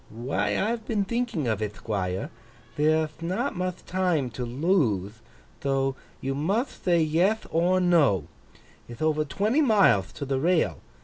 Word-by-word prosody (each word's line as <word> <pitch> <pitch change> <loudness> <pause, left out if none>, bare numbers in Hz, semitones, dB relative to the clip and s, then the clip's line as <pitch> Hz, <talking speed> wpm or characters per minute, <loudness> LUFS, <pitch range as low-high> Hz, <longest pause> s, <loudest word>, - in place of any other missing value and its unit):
'Why, 120 +5 -1
I've 225 +2 -1
been 210 -4 0
thinking 235 - -1
of 110 -2 -1
it, 105 -1 -2
Thquire. 95 -4 -3 0.4
There'th 155 +1 +1
not 175 +3 -2
muth 180 0 -4
time 175 -9 0
to 125 +3 -5
lothe, 120 - +1 0.5
tho 135 -1 0 0.3
you 135 +1 -2
muth 195 - -1
thay 175 -2 +4
yeth 175 +8 +1
or 175 +3 +2
no. 160 - +3 0.7
Ith 120 +6 -6
over 155 -1 +2
twenty 215 - +1
mileth 195 - +4
to 140 - -5
the 135 -1 -1
rail. 170 +3 +1
155 Hz, 145 wpm, -26 LUFS, 130-185 Hz, 0.7 s, thay